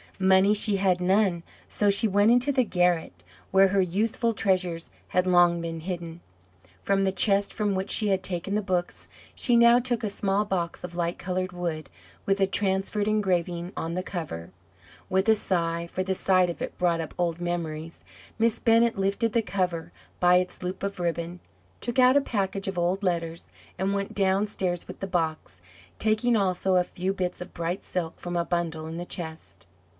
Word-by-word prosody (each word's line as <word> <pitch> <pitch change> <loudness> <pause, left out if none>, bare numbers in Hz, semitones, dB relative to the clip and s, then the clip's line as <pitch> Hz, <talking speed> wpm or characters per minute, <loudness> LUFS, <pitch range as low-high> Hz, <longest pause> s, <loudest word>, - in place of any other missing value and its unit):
Money 190 +1 +4
she 210 -1 +5
had 185 -2 +1
none, 185 -1 +2 0.3
so 205 - +1
she 200 +3 +4
went 205 +1 +3
into 245 +4 +4
the 260 -2 +2
garret, 175 - 0 0.3
where 195 0 +5
her 195 0 +2
youthful 220 +6 0
treasures 185 -5 -1 0.2
had 180 0 +1
long 175 -1 +4
been 165 -1 -4
hidden. 170 -1 -6 0.6
From 195 0 +1
the 190 - +2
chest 200 +1 +2
from 210 -2 0
which 190 +1 -2
she 210 -2 +2
had 190 -1 +1
taken 185 +1 -3
the 210 - +1
books 180 -2 -2 0.3
she 240 - +1
now 235 +1 +6
took 245 -1 -1
a 215 - 0
small 200 +1 0
box 175 -4 -3
of 175 -1 -7
light 170 0 -1
coloured 185 0 -3
wood, 170 -4 -4 0.4
with 195 0 +2
a 195 - +4
transferred 195 +1 0
engraving 180 -4 0
on 165 +1 -3
the 185 - -2
cover. 155 - -6 0.6
With 190 +2 +1
a 220 - +6
sigh 170 -4 -1
for 185 +2 -3
the 190 0 -1
sight 185 -2 +2
of - - -10
it - - -6
brought 170 -2 +1
up 160 - -7
old 170 -2 -1
memories 165 -2 -4 0.4
Miss 230 0 +2
Bennett 230 -1 +3
lifted 200 +3 0
the 230 - +3
cover 180 -5 -2 0.3
by 180 0 +5
its 180 0 -2
loop 180 +1 -4
of 200 -1 -3
ribbon, 170 0 -3 0.4
took 240 0 -4
out 255 +2 +6
a - - +4
package 195 -5 -2
of 195 - -3
old 180 +3 0
letters, 170 -2 -2 0.3
and 190 +1 0
went 200 0 -3
downstairs 190 -2 0
with 185 - -9
the 195 - -4
box, 160 - -3 0.4
taking 220 +2 +2
also 190 -2 +1
a 180 - +4
few 180 +1 -3
bits 180 -2 -3
of 180 - -8
bright 170 +2 -3
silk 170 -3 -4
from 175 0 -5
a 170 0 0
bundle 165 -3 -2
in 165 +1 -6
the 175 - -5
chest. 160 - -7
185 Hz, 190 wpm, -26 LUFS, 175-200 Hz, 0.6 s, now